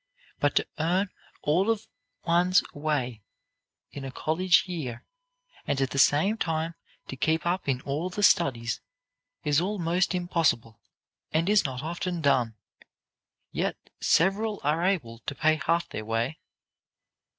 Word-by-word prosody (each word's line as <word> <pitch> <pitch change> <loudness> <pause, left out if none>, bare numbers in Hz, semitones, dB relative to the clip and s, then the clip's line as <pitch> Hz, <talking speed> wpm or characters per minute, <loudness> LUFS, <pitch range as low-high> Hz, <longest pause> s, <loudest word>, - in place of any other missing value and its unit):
But - - +1
to - - +2
earn 180 +5 +1 0.3
all 180 +8 +2
of 225 -2 0 0.4
one's 175 +2 +4
way 140 -7 -2 0.7
in 140 - -7
a 135 - -4
college 175 +7 +3
year, 150 -10 -5 0.6
and 140 - 0
at 135 -1 0
the 140 - -1
same 190 +11 +4
time 165 0 -1 0.3
to - - -6
keep 160 +4 0
up 175 -3 0
in 125 -2 0
all 150 +7 -2
the 205 +3 -3
studies, 120 - +3 0.6
is 145 +1 +3
almost 180 -2 0
impossible, 155 - 0 0.5
and 165 +2 +1
is 210 0 +4
not 130 0 -3
often 175 +2 -3
done. 130 -7 +2 1.0
Yet - - -1 0.2
several 200 +5 +2
are 155 +4 +1
able 145 -12 0
to 140 - -2
pay 155 0 +2
half 170 +1 +1
their 110 - -5
way." 115 +7 -1
160 Hz, 140 wpm, -27 LUFS, 135-180 Hz, 1.0 s, one's